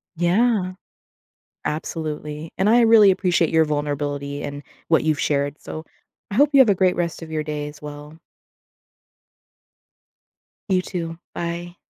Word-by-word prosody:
Yeah. 185 +2 +2 0.9
Absolutely, 155 0 -4
and 195 +3 +2
I 240 +1 +6
really 225 -3 +7
appreciate 180 -3 +2
your 160 -1 +4
vulnerability 145 -1 -3
and 145 0 -6 0.3
what 160 -1 +3
you've 155 0 +1
shared, 145 -1 0
so, 155 +1 -7 0.4
I 200 - -5
hope 290 +3 +5
you 275 - +5
have 245 -5 +7
a 200 - +4
great 185 -1 +2
rest 170 -1 -2
of 160 -1 -9
your 155 - -1
day 150 -1 -4
as 150 - -14
well. 150 +1 -9 2.5
You, 185 -1 +2
too. 165 -3 -5 0.2
Bye. 175 +1 -5
165 Hz, 140 wpm, -22 LUFS, 150-185 Hz, 2.5 s, really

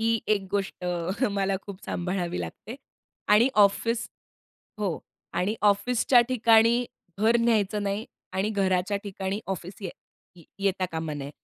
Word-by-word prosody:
ही 225 0 +2
एक 200 -3 +1
गोष्ट 195 -2 -2 0.5
मला 195 -1 0
खूप 200 -1 -10
सांभाळावी 180 0 -2
लागते. 225 +5 -7 0.5
आणि 215 +5 +6 0.2
ऑफिस 230 +4 0 0.7
हो. 190 -6 -1 0.3
आणि 195 +4 0
ऑफिसच्या 235 +4 +4
ठिकाणी 235 0 +4 0.4
घर 225 +2 +5
न्यायचं 210 -3 +2
नाही 200 +2 -2 0.3
आणि 190 +3 0
घराच्या 190 -1 +1
ठिकाणी 195 0 -3
ऑफिस 190 0 -5
ये 185 - -3 0.5
ये 170 - -15 0.2
येता 190 -1 +1
कामा 160 -2 -3
नये. 140 -1 -6
200 Hz, 130 wpm, -26 LUFS, 190-225 Hz, 0.7 s, आणि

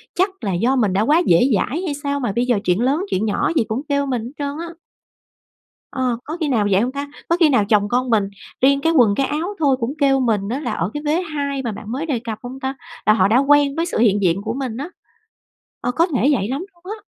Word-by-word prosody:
chắc 375 +3 +2
là 195 - -1
do 235 +10 +1
mình 215 -7 +1
đã 195 - +2
quá 300 +10 +3
dễ 170 - +5
dãi 285 - -1
hay 310 - -2
sao 285 0 -1
mà 245 -6 -1
bây 240 - +1
giờ 240 -4 +2
chuyện 180 +1 +1
lớn 285 +9 +1
chuyện 205 - 0
nhỏ 210 - 0
gì 295 - +3
cũng 225 +4 -2
kêu 280 0 +1
mình 255 -4 -2
hết 240 - -7
trơn 285 0 -3
á. 340 - -5 1.2
Ờ. 255 -3 -1
Có 315 +3 -6
khi 315 - 0
nào 230 -7 +1
vậy 190 +1 +4
hông 245 +3 0
ta? 280 +1 -5 0.2
Có 335 - +3
khi 325 -3 +5
nào 255 -7 +3
chồng 205 -2 +3
con 250 +2 0
mình 210 -4 +2 0.3
riêng 275 +2 +4
cái 325 +3 +2
quần, 235 -9 +4
cái 275 - +1
áo 335 +7 -3
thôi 280 -4 +3
cũng 240 +3 -2
kêu 275 -2 +3
mình 215 -6 0
á 255 +4 -2
là 300 - -3
ở 165 +3 -1
cái 295 - -5
vế 310 +4 +1
2 285 -5 -3
mà 235 - -2
bạn 210 +1 -8
mới 275 +6 -3
đề 280 -7 -1
cập 225 -2 -6
hông 255 +2 -7
ta? 265 0 -3 0.3
Là 215 - +6
họ 190 -3 +3
đã 220 +4 +3
quen 285 +1 +4
với 330 +1 0
sự 355 - -3
hiện 205 -3 +3
diện 180 0 +1
của 220 +1 -2
mình 255 -3 -4
á. 285 +6 -5 0.9
Ờ, - - -1
có 330 +6 +2
thể 275 -5 +1
vậy 205 -7 0
lắm 275 +9 -3
luôn 345 0 -30
á. - - -19
260 Hz, 270 wpm, -20 LUFS, 220-290 Hz, 1.2 s, Là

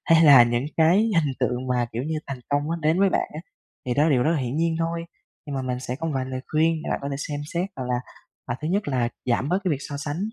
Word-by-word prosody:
hay 165 - +6
là 140 -5 +9
những 120 +3 0
cái 160 +3 +5
hình 175 -10 +2
tượng 125 +1 -1
mà, 125 -1 +1
kiểu 120 +3 -2
như, 155 +1 -2
thành 135 -2 -5
công 145 0 +2
nó 165 - 0
đến 160 +4 +2
với 195 -1 +5
bạn - - 0
á, 155 - -5 0.5
thì 125 - 0
đó 145 - +3
là 160 - +3
điều 125 -3 +3
rất 160 - +2
là 165 - +1
hiển 125 +2 -3
nhiên 165 0 +1
thôi. 165 0 -2 0.4
Nhưng 145 -2 -5
mà 135 - -1
mình 125 -1 -3
sẽ 125 0 -4
có 165 +3 -4
một - - -1
vài 130 - -1
lời 130 0 -5
khuyên 160 +2 +2
để - - -4
bạn - - -1
có 140 - -4
thể 140 - -2
xem 145 0 -4
xét, 180 +3 -1
hoặc 130 - -4
là 125 - +2 0.5
hoặc 120 0 -3
thứ 155 - -2
nhất 200 +1 0
là 125 -4 0 0.2
giảm 130 +4 0
bớt 185 +2 +2
cái 180 - +1
việc 140 - 0
so 145 - -4
sánh 145 +2 -4
145 Hz, 300 wpm, -24 LUFS, 130-165 Hz, 0.5 s, là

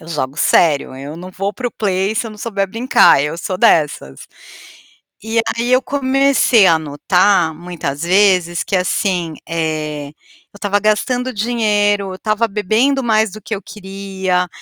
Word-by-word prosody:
Eu 160 - -13
jogo 145 -4 -3
sério, 145 -2 +2
eu 140 +3 -8
não 180 +2 -9
vou 195 +2 -3
para 250 -1 -3
o - - -21
play, 195 0 -1
se 225 - -1
eu - - -7
não 215 - -12
souber 200 -3 -2
brincar, 225 - +4
eu 150 +3 -3
sou 185 +1 -4
dessas. 150 - +1 1.0
E 225 +2 0 0.2
aí 240 +2 -1
eu 255 +1 +4
comecei 270 -5 +3
a 165 -3 +4
notar 160 +3 +1
muitas 160 -4 -6
vezes 180 -2 +2
que, - - -4
assim, 180 -2 -1
eh, 155 -3 -3
eu 155 +6 -22
estava 205 0 -1
gastando 245 +5 0
dinheiro, 205 -2 0
eu - - -6
estava 215 +3 -1
bebendo 220 +7 +1
mais 220 -2 +2
do 215 0 -10
que 220 - -4
eu 200 - -6
queria, 190 -2 -3
195 Hz, 165 wpm, -17 LUFS, 165-220 Hz, 1.0 s, brincar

